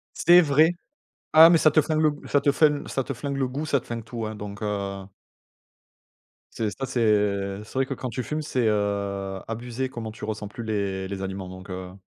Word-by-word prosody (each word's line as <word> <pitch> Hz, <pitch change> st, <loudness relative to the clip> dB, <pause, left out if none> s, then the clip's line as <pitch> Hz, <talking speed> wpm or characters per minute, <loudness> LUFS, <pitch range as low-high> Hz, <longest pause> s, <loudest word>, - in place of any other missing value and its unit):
C'est 175 Hz, +1 st, +7 dB
vrai. 155 Hz, +3 st, +4 dB, 0.6 s
Ah! 160 Hz, +1 st, +10 dB
Mais 170 Hz, -, +6 dB
ça 155 Hz, -1 st, +4 dB
te 155 Hz, +1 st, +5 dB
flingue 155 Hz, +1 st, 0 dB
le 155 Hz, -, +5 dB
g 145 Hz, -, -11 dB
ça 145 Hz, -, +4 dB
te 140 Hz, 0 st, +3 dB
flin 150 Hz, 0 st, +2 dB
ça 135 Hz, -, -2 dB
te 140 Hz, -, -4 dB
flingue 140 Hz, +2 st, -4 dB
le 135 Hz, -, 0 dB
goût, 140 Hz, +5 st, -4 dB
ça 140 Hz, -3 st, +1 dB
te -, -, -19 dB
flingue 115 Hz, -1 st, -5 dB
tout, 115 Hz, -1 st, -5 dB
hein, 110 Hz, 0 st, -5 dB
donc 100 Hz, 0 st, -8 dB
heu 100 Hz, -2 st, -3 dB, 1.5 s
Tu 115 Hz, -, -3 dB
sais, 105 Hz, -, 0 dB
ça 135 Hz, -, -2 dB
c'est, 125 Hz, -1 st, -2 dB
heu, 100 Hz, -2 st, +1 dB
c'est -, -, -15 dB
vrai 135 Hz, 0 st, +1 dB
que 135 Hz, -, -3 dB
quand 130 Hz, 0 st, -5 dB
tu 125 Hz, -, -3 dB
fumes, 155 Hz, +4 st, -3 dB
c'est, 130 Hz, -5 st, 0 dB
heu, 100 Hz, -2 st, -1 dB
abusé 120 Hz, +3 st, -4 dB
comment 115 Hz, -3 st, -6 dB
tu 110 Hz, -, -8 dB
ressens 105 Hz, -1 st, -4 dB
plus 115 Hz, +3 st, -8 dB
les 100 Hz, -3 st, -2 dB
les 95 Hz, 0 st, -5 dB
aliments, 95 Hz, -1 st, -5 dB
donc 95 Hz, +1 st, -10 dB
heu 90 Hz, 0 st, -6 dB
115 Hz, 235 wpm, -25 LUFS, 100-140 Hz, 1.5 s, Ah